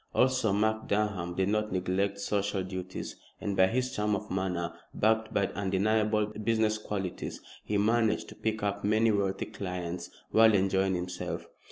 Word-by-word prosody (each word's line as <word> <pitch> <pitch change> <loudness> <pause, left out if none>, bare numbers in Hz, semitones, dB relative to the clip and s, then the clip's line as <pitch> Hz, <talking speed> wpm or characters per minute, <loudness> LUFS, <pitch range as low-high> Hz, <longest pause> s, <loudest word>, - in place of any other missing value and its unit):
Also 130 -4 +3
Mark 110 +2 +1
Durham 100 -4 0
did 95 +1 +1
not 105 0 0
neglect 95 +2 0
social 100 -1 0
duties, 95 0 -6 0.2
and 100 - -2
by 95 0 +5
his 130 +4 -1
charm 105 0 +1
of 105 +2 -6
manner, 90 -3 -1 0.2
backed 110 +1 +2
by 100 - +2
undeniable 105 +2 +1
business 110 0 0
qualities, 100 -4 -4 0.2
he 105 - 0
managed 110 +1 +2
to - - -11
pick 110 -1 -2
up 100 0 -1
many 110 +2 +3
wealthy 100 -1 0
clients 90 -4 -5 0.2
while 110 -1 +6
enjoying 95 0 +2
himself. 90 0 -4
100 Hz, 155 wpm, -30 LUFS, 95-110 Hz, 0.2 s, while